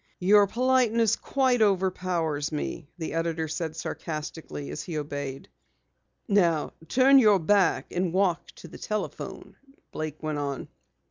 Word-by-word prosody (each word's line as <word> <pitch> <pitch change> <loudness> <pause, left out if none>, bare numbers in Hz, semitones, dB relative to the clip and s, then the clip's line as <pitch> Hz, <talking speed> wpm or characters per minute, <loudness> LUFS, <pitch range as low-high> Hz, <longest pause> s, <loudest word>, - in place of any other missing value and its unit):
"Your 200 +2 +5
politeness 235 -2 +2
quite 260 -3 +1
overpowers 180 -6 0
me," 150 0 -4
the 160 -3 -4
editor 165 -1 -1
said 160 0 -4
sarcastically, 150 - -6
as 75 - -5
he 165 -3 -5
obeyed. 145 -2 -5 0.8
"Now 175 -7 +2
turn 270 +2 +6
your 210 -5 +6
back 190 0 +2
and 180 -1 -1
walk 180 -2 +1
to - - -11
the - - -12
telephone," 215 0 -5 0.3
Blake 155 0 -5
went 155 -1 -2
on. 140 -2 -4
170 Hz, 130 wpm, -27 LUFS, 155-205 Hz, 0.8 s, turn